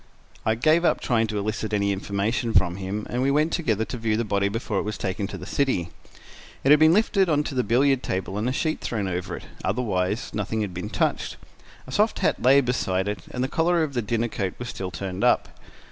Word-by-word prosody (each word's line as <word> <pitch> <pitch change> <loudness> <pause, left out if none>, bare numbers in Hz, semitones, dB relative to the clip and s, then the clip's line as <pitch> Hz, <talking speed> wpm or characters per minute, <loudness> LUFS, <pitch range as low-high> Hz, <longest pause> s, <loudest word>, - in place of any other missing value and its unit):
I 110 - +3
gave 155 +8 +3
up - - +3
trying 115 -2 +1
to 105 -1 -3
elicit 105 +1 -2
any 100 -1 +2
information 100 +4 -1
from 90 0 +3
him, 100 +2 -4
and 125 - -2
we 135 - +2
went 150 +3 +2
together 110 - 0
to 125 - -5
view 110 -1 0
the 115 - 0
body 100 -1 +1
before 110 -1 -2
it - - 0
was 105 +1 -4
taken 100 +1 -2
to 95 - -7
the 90 - -8
city. 100 -8 0 0.7
It 135 - +4
had 150 - +8
been 155 0 +7
lifted 195 -1 +3
on 150 -2 +2
to 145 - -5
the 130 - +2
billiard 130 +4 +3
table 95 -2 -3
and 115 +4 0
a - - 0
sheet 155 +4 -1
thrown 105 -5 -2
over 90 -1 -3
it; - - -10 0.2
otherwise 100 -1 -1
nothing 110 +1 -2
had 100 -4 -3
been 90 +4 -5
touched. - - -1 0.5
A 130 - -10
soft 210 +10 +2
hat - - 0
lay 135 +3 +6
beside 95 -7 0
it, 105 -2 -2
and 125 - -3
the - - +1
collar 170 +3 +2
of 145 -3 -3
the 120 - 0
dinner 115 +2 0
coat 100 -5 -3
was 120 0 -6
still 95 -5 -4
turned 95 +2 -5
up. - - +3
110 Hz, 235 wpm, -25 LUFS, 100-135 Hz, 0.7 s, had